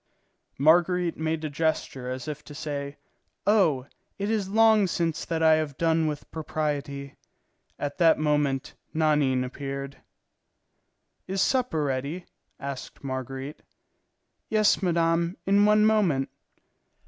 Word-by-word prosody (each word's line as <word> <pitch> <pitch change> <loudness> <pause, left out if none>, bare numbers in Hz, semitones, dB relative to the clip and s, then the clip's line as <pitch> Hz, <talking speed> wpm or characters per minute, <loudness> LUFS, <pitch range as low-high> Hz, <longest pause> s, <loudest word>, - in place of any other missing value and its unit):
Marguerite 175 +4 +3
made 160 0 -2
a - - -2
gesture 140 -4 -1
as 130 +1 -5
if 150 -1 -5
to 145 - -11
say, 145 -2 -5 0.5
"Oh, 175 -11 +3 0.3
it 205 +2 -2
is 205 -4 -1
long 220 -1 +5
since 165 -2 -1
that 165 -1 -1
I 160 0 +7
have 150 -3 -3
done 165 -1 +2
with 150 -2 -5
propriety!" 145 -3 -3 0.6
At 145 +3 -4
that 165 -2 +5
moment 145 -3 0 0.2
Nanine 150 -5 +2
appeared. 140 +1 -6 1.3
"Is 190 +1 -2
supper 245 - +1
ready?" 140 +6 -3 0.3
asked 140 -1 -7
Marguerite. 135 +1 -5 0.9
"Yes, 215 -1 +3
madame, 170 -1 +1
in 200 +1 +4
one 210 0 +5
moment." 190 -12 +2
155 Hz, 120 wpm, -26 LUFS, 140-180 Hz, 1.3 s, I